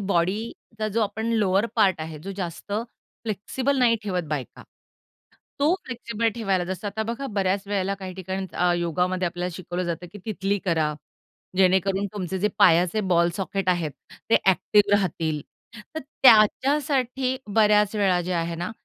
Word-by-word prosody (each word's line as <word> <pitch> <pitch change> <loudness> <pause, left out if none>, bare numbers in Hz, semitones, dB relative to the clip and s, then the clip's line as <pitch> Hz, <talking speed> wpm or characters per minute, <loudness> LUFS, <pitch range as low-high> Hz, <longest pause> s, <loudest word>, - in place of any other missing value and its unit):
बॉडीचा 205 +4 -2
जो 220 +2 -1
आपण 220 +2 -2
लोवर 205 -1 +2
पार्ट 190 -6 +3
आहे 155 -1 -6
जो 195 +6 -7
जास्त 180 +1 -6 0.5
फ्लेक्सिबल 255 +6 -1
नाही 235 -2 +4
ठेवत 185 -4 -1
बायका, 145 -4 -5 1.0
तो 295 +5 +3
फ्लेक्सिबल 230 -2 -2
ठेवायला 195 -6 0
जसं 190 +3 -5
आता 205 +2 -2
बघा 275 +4 -4
बऱ्याच 195 0 +1
वेळेला 200 -1 -1
काही 190 -2 -8
ठिकाणी 190 +1 -4
अ, 180 0 +2
योगामध्ये 180 +2 0
आपल्याला 175 +1 -3
शिकवलं 180 -1 -4
जातं, 175 +1 -4
की 205 - -9
तिथली 200 -2 -1
करा. 160 -4 +1 0.6
जेणेकरून 190 +1 +3
तुमचे 190 -2 -3
जे 210 +3 +2
पायाचे 180 +1 +5
बॉल 170 0 +4
सॉकेट 195 -1 -2
आहेत, 170 -4 +1 0.4
ते - - +7
ॲक्टिव 205 +2 +3
राहतील. 160 -6 +1 0.5
तर 315 - -3
त्याच्यासाठी 260 +1 +3 0.2
बऱ्याच 210 -1 +4
वेळा 190 -4 +2
जे 185 - 0
आहे 170 0 -1
ना, 175 +2 -4
195 Hz, 150 wpm, -24 LUFS, 180-215 Hz, 1.0 s, ते